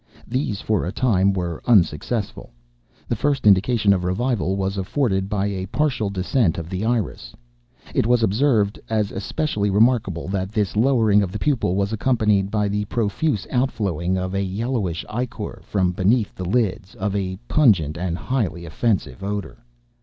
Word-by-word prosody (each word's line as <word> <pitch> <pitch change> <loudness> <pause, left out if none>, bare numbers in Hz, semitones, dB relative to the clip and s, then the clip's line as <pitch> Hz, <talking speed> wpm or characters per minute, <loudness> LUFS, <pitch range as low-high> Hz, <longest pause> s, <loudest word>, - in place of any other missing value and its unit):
These, 120 -5 -2
for 105 -4 0
a 90 - -2
time, 100 -4 +2
were 90 -4 -3
unsuccessful. 105 0 +1 0.6
The - - 0
first 140 +2 0
indication 105 +1 +4
of 90 -2 -1
revival 95 +1 0
was 95 0 -1
afforded 95 -1 0
by 100 -2 0
a 95 -2 -3
partial 130 -4 0
descent 95 0 0
of 85 0 -6
the 95 +2 -2
iris. 110 - -2 0.6
It - - +1
was 120 -1 +3
observed, 110 -2 +2
as 110 -2 0
especially 105 0 -2
remarkable, 105 -5 +2
that 95 +1 -2
this 105 -3 0
lowering 110 -3 +4
of 95 -3 -2
the 105 - -4
pupil 120 -9 0
was 100 +2 0
accompanied 105 -4 +1
by 105 0 0
the 105 +1 -1
profuse 110 +3 -1
out 130 0 +2
flowing 95 - -1
of 95 0 -3
a 100 - 0
yellowish 100 -3 -2
ichor 120 -1 -5
(from 95 -3 +1
beneath 105 +5 +1
the 90 - -6
lids) 110 -3 -1
of 100 0 -2
a 95 -2 -2
pungent 95 - +3
and 85 0 -2
highly 100 -9 -2
offensive 80 - -1
odor. 100 -8 -5
100 Hz, 160 wpm, -22 LUFS, 95-115 Hz, 0.6 s, indication